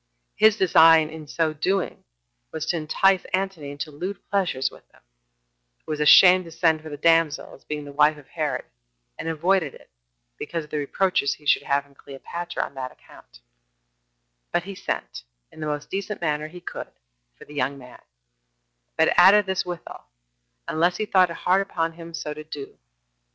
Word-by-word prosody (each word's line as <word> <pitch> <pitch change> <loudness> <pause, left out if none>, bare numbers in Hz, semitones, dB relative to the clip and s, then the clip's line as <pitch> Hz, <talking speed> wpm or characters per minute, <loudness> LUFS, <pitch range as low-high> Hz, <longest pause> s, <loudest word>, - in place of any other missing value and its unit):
His 220 0 +5
design 165 -4 +6
in 160 -1 -9 0.3
doing 190 +3 0
so - - -36 0.5
was 160 - -4
to - - 0
entice 185 +5 +2
Antony 190 -6 -4
into 145 +2 -6
lewd 180 +7 -5
pleasures 180 -10 0
with - - -18
them, - - -26 0.8
who - - -6
was 150 - -3
ashamed 180 +4 +7
to 165 - -11
send 160 -1 +2
for 155 - -9
the 145 - -7
damsel, 165 -1 +2
as - - -16
being 150 -1 -5
the 145 - -9
wife 150 +1 +3
of 145 - -16
Herod, - - -3 0.5
and - - -5
avoided 165 -1 +1
it, - - -18 0.5
because 165 -2 -4
of 150 - -17
the 150 - -1
reproaches 145 0 0
he 150 - -22
should - - +4
have 140 0 0
from 140 0 -24
Cleopatra 170 +6 -6
on - - -8
that 130 -1 -6
account; - - -18 1.1
but 175 - 0
he 195 +2 -7
sent, - - -5 0.3
in - - -15
the 155 - -3
most 150 -1 -4
decent 200 +1 -4
manner 150 -2 -1
he 175 +3 -12
could, - - -7 0.5
for - - -14
the 150 - -14
young 140 -1 -1
man; 125 -2 -14 1.0
but 160 - +4
added 195 +3 +7
this 190 -1 -2
withal, 175 -1 -8 0.6
unless 175 +3 +1
he 215 - -1
thought 185 -3 +4
it 170 - -6
hard 185 +2 +2
upon 165 -4 -2
him 165 0 -9
so 150 -2 -5
to 155 +1 -9
do. 145 -2 -9
160 Hz, 180 wpm, -24 LUFS, 150-180 Hz, 1.1 s, ashamed